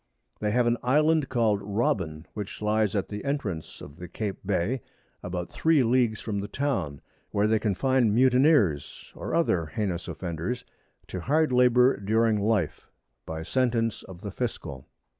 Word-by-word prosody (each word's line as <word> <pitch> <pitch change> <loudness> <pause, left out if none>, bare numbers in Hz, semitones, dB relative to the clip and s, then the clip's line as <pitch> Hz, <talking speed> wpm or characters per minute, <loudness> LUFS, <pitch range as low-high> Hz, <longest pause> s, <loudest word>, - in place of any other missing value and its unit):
They 105 - 0
have 120 +3 +2
an 120 0 +2
Island 150 +3 +3
call'd 110 -5 +1
Robin, 95 -7 -1
which 105 -2 -6
lies 105 -1 +1
at 100 - 0
the 105 0 -5
Entrance 110 - -3
of 70 - -11
the 90 0 -8
Cape 100 +3 -4
Bay, 100 +6 0 0.4
about 90 -1 -5
3 160 -4 +3
Leagues 120 -2 +2
from 105 -3 -3
the 100 - -4
Town, 100 - -2 0.3
where 100 +1 +1
they 110 0 +3
confine 120 +3 +2
Mutineers, 125 - +3
or - - -4
other 90 - +1
heinous 95 -2 -3
Offenders, 90 +8 -4 0.4
to 90 - -6
hard 150 - +2
Labour 125 0 +5
during 110 +2 +2
Life, 100 -5 0 0.4
by 80 0 -4
Sentence 115 0 0
of 90 -1 -12
the 100 -2 -5
Fiscal. 85 - -5
110 Hz, 155 wpm, -27 LUFS, 95-125 Hz, 0.4 s, Labour